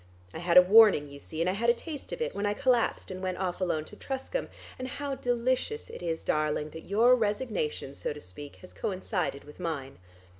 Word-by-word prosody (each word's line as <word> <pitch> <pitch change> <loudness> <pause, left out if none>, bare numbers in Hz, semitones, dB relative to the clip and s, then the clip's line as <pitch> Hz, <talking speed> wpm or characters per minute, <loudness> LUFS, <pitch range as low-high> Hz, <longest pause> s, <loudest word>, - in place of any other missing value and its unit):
I - - -6
had 175 0 +3
a 180 - +11
warning 200 -6 +7
you 140 0 -11
see, 155 +3 -6
and 170 - +2
I 185 - +2
had 230 +4 +1
a 235 - +5
taste 300 +2 -8
of 475 - -2
it, - - -3
when 205 +1 -1
I 205 - 0
collapsed 250 -6 +1
and 185 0 -6
went 185 -1 -2
off 185 -1 -2
alone 160 -4 0
to 210 - -12
Truscombe; 270 - -4 0.3
and 255 - -3
how 280 +2 -4
delicious 255 - -1
it - - -9
is, 165 -2 -2
darling, 150 0 0
that 160 - -10
your 230 +6 +5
resignation, 210 - -2
so - - -4
to 150 - -7
speak, 140 +8 -10
has 185 - -12
coincided 185 -6 -2
with 150 +3 -14
mine. 145 - -4
185 Hz, 220 wpm, -29 LUFS, 155-240 Hz, 0.3 s, a